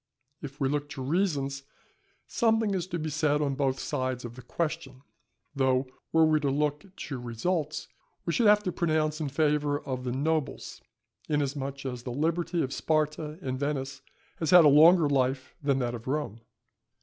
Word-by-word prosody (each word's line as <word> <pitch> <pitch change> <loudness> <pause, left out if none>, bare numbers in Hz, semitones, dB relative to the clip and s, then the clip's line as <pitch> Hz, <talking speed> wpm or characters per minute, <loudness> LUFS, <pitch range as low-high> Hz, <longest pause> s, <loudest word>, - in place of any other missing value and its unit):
If 145 -1 -8
we 135 - +1
look 145 +1 -2
to 145 -3 -6
reasons, 140 -3 0 0.6
something 225 -3 +1
is 185 -2 -2
to 175 - -3
be 155 -1 -3
said 150 -1 +1
on 145 -2 0
both 135 -1 0
sides 130 -1 -2
of 120 0 -8
the 130 - -10
question; 145 -1 -4 0.5
though 130 -1 +2 0.3
were 160 0 +5
we 155 -1 +3
to 145 -2 0
look 150 +4 -1
to 135 -4 -6
results, 150 +7 -2 0.4
we 170 - -1
should 235 - +3
have 210 0 +5
to 180 - -1
pronounce 155 -2 0
in 150 - -2
favour 145 0 +1
of 130 -1 -4
the 125 - -2
nobles, 150 +3 -2 0.5
inasmuch 140 -2 -2
as 125 -2 -4
the 125 - -7
liberty 165 +5 0
of 135 - -3
Sparta 155 0 -1
and 130 -1 -3
Venice 135 -1 -3 0.4
has 160 - -2
had 175 -3 +8
a - - +8
longer 160 +3 +7
life 130 -1 0
than 140 -2 +1
that 120 -2 -1
of 115 0 -8
Rome. 135 -6 -2
145 Hz, 175 wpm, -28 LUFS, 135-160 Hz, 0.6 s, had